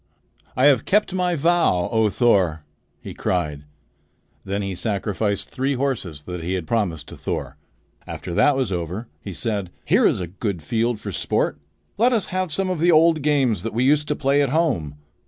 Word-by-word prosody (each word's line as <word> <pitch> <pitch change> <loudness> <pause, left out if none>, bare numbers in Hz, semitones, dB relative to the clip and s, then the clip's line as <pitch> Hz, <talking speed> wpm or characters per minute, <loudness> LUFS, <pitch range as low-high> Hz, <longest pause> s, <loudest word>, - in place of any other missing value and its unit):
"I 130 - +4
have 135 -5 +5
kept 205 -1 +2
my 180 -2 +1
vow, 160 - +2
O 110 -1 +3
Thor!" 95 -9 +2 0.4
he - - -8
cried. 75 -5 -2 0.8
Then 100 +1 -2
he 95 -1 -3
sacrificed 100 +1 -2
three 135 +2 -1
horses 115 - -2
that 90 +1 -6
he 90 +3 -2
had 90 -3 -2
promised 90 -7 -1
to - - -9
Thor. - - -4 0.5
After 85 - -6
that 140 +10 +4
was 130 -7 0
over, 90 +6 -4
he 100 - -7
said: 100 -1 -2 0.2
"Here - - +4
is - - +1
a 90 - -2
good 90 -1 -4
field 115 +6 0
for 105 -1 -6
sport. - - -1 0.4
Let 245 +3 +4
us 220 -4 +1
have 185 -2 -1
some 190 +4 -1
of 180 - -2
the 175 +2 +4
old 160 0 +5
games 135 - +2
that 115 +2 -5
we 120 - +2
used 150 +2 +3
to 150 - 0
play 140 0 +2
at 140 - +1
home. 110 - 0
115 Hz, 190 wpm, -22 LUFS, 90-145 Hz, 0.8 s, have